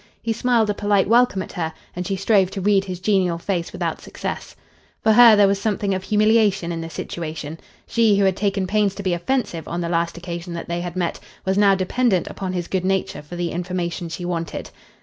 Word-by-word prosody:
He 225 -1 0
smiled 235 -1 +2
a 205 - +1
polite 205 -1 +1
welcome 230 -4 +3
at - - -11
her, 160 -4 -3 0.2
and 180 0 -4
she 195 - -1
strove 195 -1 +3
to 195 - -5
read 195 0 +3
his 185 -2 -5
genial 185 -3 +1
face 170 -1 -2
without - - -3
success. - - -6 0.5
For 220 - +5
her 235 -1 +9
there 205 -1 +5
was 195 0 0
something 205 -2 0
of 190 - -2
humiliation 210 -4 +3
in 165 -1 -3
the 165 - -6
situation. 160 -2 -6 0.3
She, 225 -3 +3
who 200 - +3
had 190 -1 +2
taken 195 -1 0
pains 205 0 +1
to 200 - -6
be 185 -2 +1
offensive 175 -2 -2
on 170 - -3
the 170 - -2
last 170 0 0
occasion 170 0 -6
that 170 - -6
they 170 0 -2
had 175 0 -5
met, 180 -2 -2 0.3
was 190 0 +1
now 200 -1 +5
dependent 190 +1 +1
upon 190 -2 -5
his 175 -2 -3
good 190 -2 -1
nature 190 +1 -1
for 150 +4 -10
the 175 -1 -2
information 175 -1 -3
she 175 +2 -5
wanted. 170 -2 -4
190 Hz, 220 wpm, -22 LUFS, 175-205 Hz, 0.5 s, her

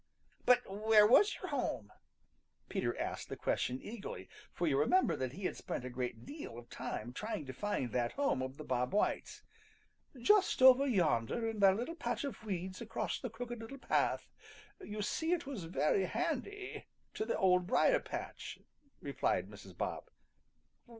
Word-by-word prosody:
"But 250 0 +6
where 210 +2 +5
was 400 - +6
your 370 - -6
home?" 180 - -2 0.8
Peter - - -1
asked - - -3
the - - -4
question 125 +1 -1
eagerly, 215 - -7 0.2
for 175 - -2
you 140 -4 +2
remember 150 - +3
he 155 +11 -9
had - - -1
spent 125 - -5
a 125 - -5
great 120 -2 -4
deal 285 - -7
of 120 0 -11
time 120 +3 -5
trying 210 - -4
to 130 - -6
find 205 - -2
that 120 0 0
home 280 - +1
of 130 +1 -4
the 155 - -7
Bob 125 -2 -1
Whites. 210 - 0 0.8
"Just 385 - +4
over 260 +2 +8
yonder 180 - +1
in 225 -1 -3
that 195 -1 +6
little 245 +8 -3
patch 240 -7 -2
of 270 -7 -5
weeds 185 -2 -4
across 225 0 -3
the 250 - -4
Crooked 240 +1 -6
Little 225 +5 -8
Path. - - +1 0.5
You 210 0 -5
see 320 - 0
it 350 - -1
was 255 -11 -5
very 175 +3 +2
handy 360 - -3 0.3
to - - -2
the 220 - -1
Old 180 -1 +3
Briar - - +4
patch," - - -6 0.4
replied - - -1
Mrs. - - -12
Bob. - - -3
210 Hz, 165 wpm, -35 LUFS, -, 0.8 s, over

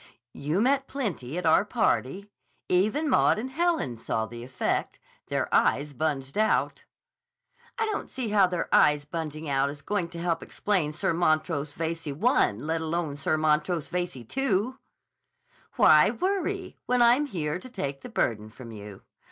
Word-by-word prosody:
"You 150 +8 -1
met 270 +2 +2
plenty 180 - -4
at 180 - -3
our 160 +4 +5
party. 200 - -1 0.4
Even 215 - +1
Maud 260 - +4
and 255 +5 -4
Helen 325 - 0
saw 110 0 -2
the 120 +2 -9
effect. 130 +1 -2 0.3
Their - - -1
eyes 145 +1 +2
bunged 145 +2 -2
out!" 220 0 +1 0.9
"I 450 - +1
don't 430 -1 -3
see 255 -4 -4
how 205 -3 +4
their 180 -2 -2
eyes 150 -1 +4
bunging 155 0 -5
out 140 0 +1
is 145 0 -9
going 190 -1 -1
to 170 - -8
help 170 -1 -1
explain 185 -8 -1
Sir 170 +2 -1
Montrose 155 -3 0
Veyze 165 0 -4
I, 190 - +2
let 160 +9 -3
alone 160 -2 -2
Sir 145 +2 0
Montrose 155 +1 +1
Veyze 180 -1 -2 0.2
II." 250 -3 +1 1.0
"Why - - +6
worry, 385 0 -2
when 245 -1 +4
I'm 250 +5 +4
here 165 - -3
to 255 - -11
take 140 - -4
the - - -9
burden 110 -1 -1
from 115 +1 -11
you? 105 -2 -10
165 Hz, 160 wpm, -27 LUFS, 145-220 Hz, 1.0 s, Why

